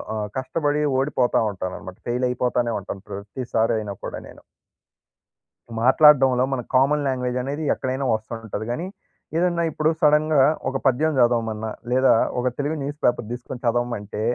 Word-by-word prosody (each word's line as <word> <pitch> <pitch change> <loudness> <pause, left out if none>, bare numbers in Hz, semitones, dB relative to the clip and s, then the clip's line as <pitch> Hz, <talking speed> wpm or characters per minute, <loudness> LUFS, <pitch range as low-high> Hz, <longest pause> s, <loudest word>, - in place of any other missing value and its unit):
ఆహ్, 105 -1 -2
కష్టపడి 145 +2 -1 0.2
ఓడిపోతా 130 -2 +1
ఉంటాననమాట. 95 0 -7
ఫెయిల్ 125 +1 0
అయిపోతానే 125 -1 0
ఉంటాను. 100 - -7
ప్రతిసారి 110 +3 -2
అయినా 105 -2 -5
కూడా - - -5
నేను. - - -14 1.4
మాట్లాడడంలో 130 -1 +6
మన 130 - -1
కామన్ 145 +3 +3
లాంగ్వేజ్ 125 -1 -1
అనేది 145 +4 -4
ఎక్కడైనా 130 +1 -3
వస్తంటది. 110 -1 -6
కానీ 145 +9 -3 0.5
ఏదన్నా 170 0 +1
ఇప్పుడు 155 +1 +1
సడెన్‌గా 150 -2 +4 0.3
ఒక 135 - -2
పద్యం 150 +5 +2
చదవమన్నా, 115 -2 +1 0.2
లేదా 130 +1 +4 0.3
ఒక 125 - 0
తెలుగు 145 +2 -1
న్యూస్ 145 +2 -5
పేపర్ 120 -2 +2
తీసుకొని 125 +1 -7
చదవమంటే, 115 -3 -1
125 Hz, 135 wpm, -23 LUFS, 115-145 Hz, 1.4 s, మాట్లాడడంలో